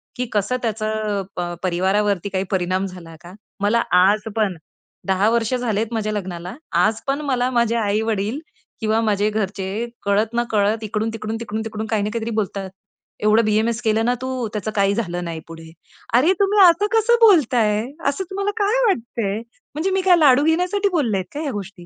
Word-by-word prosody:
की 250 0 -2
कसं 210 +5 0
त्याचं 215 -2 -2 0.2
अ, 175 0 -3
परिवारावरती 190 +2 +1
काही 190 0 -1
परिणाम 185 +1 0
झाला 175 -3 -9
का? 175 +1 -12 0.3
मला 215 +3 +2 0.2
आज 205 +3 +3
पण 200 -6 0 0.5
10 190 +3 +3
वर्ष 235 +1 0
झालेत 230 -2 -1
माझ्या 215 -1 -1
लग्नाला. 180 -1 -5 0.2
आज 215 +1 +2
पण 280 +2 0
मला 255 -3 0
माझे 235 -1 +1
आई-वडील 215 +3 -1 0.4
किंवा 220 +1 +1
माझे 210 -1 +1
घरचे 205 +1 -3 0.2
कळत 210 +3 +1
ना 240 - +2
कळत 215 +1 +1
इकडून-तिकडून, 220 +1 -3
तिकडून-तिकडून 220 -1 -4
काही 215 -2 0
ना 210 - -1
काहीतरी 230 0 -3
बोलतात. 195 -2 -2 0.5
एवढं 215 +1 +4
बी-एम-एस 220 +2 +1
केलं 220 0 +1
ना 245 - +2
तू, 260 -3 -3
त्याचं 215 +1 -3
काही 200 0 +3
झालं 175 -6 -3
नाही 165 -1 -5
पुढे. 165 -1 -11 0.5
अरे, 325 +9 +4
तुम्ही 400 +1 +3
असं 345 +5 +3
कसं 450 +1 +4
बोलताय? 245 - +4 0.3
असं 285 +7 0
तुम्हाला 400 +1 -1
काय 415 +3 +2
वाटतंय? 230 - -1 0.4
म्हणजे 360 +5 -1
मी 380 0 +1
काय 365 -1 +5
लाडू 285 -3 +5
घेण्यासाठी 360 +5 +1
बोललेत 235 - 0
का 290 - -4
ह्या 290 -4 -2
गोष्टी. 195 -3 -7
220 Hz, 170 wpm, -21 LUFS, 200-245 Hz, 0.5 s, काय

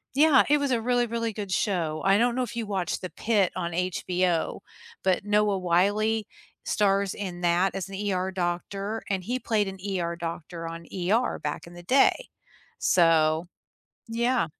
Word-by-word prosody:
yeah, 295 -2 +6
it 295 - +5
was 280 -2 0
a 235 -2 +1
really, 245 0 +2
really 230 0 -2
good 200 -2 -5
show. 170 -6 0
I 195 +1 +4
don't 235 +2 +2
know 255 - 0
if 235 - -6
you 230 -2 -2
watched 195 -3 -2
The 185 - -5
Pitt 210 -5 +1
on 175 -2 -2
HBO, 180 -1 0 0.4
but 190 0 +2
Noah 205 -1 +2
Wiley 205 +5 +2 0.4
stars 200 -1 +1
in 180 -4 -6
that 175 +1 +2
as 195 0 -4
an 195 - -7 0.2
ER 185 +1 -1
doctor 195 +4 -3
and 190 -2 -1
he 245 +7 -1
played 215 -4 0
an 195 0 -6 0.2
ER 170 0 -2
doctor 165 0 -6
on 165 0 -7
ER 200 +7 0
back 150 +3 -4
in 170 - -12
the 175 0 -11
day, 275 - +3 0.5
so, 165 -1 +3 0.6
yeah. 235 +2 +1
195 Hz, 175 wpm, -26 LUFS, 175-220 Hz, 0.6 s, yeah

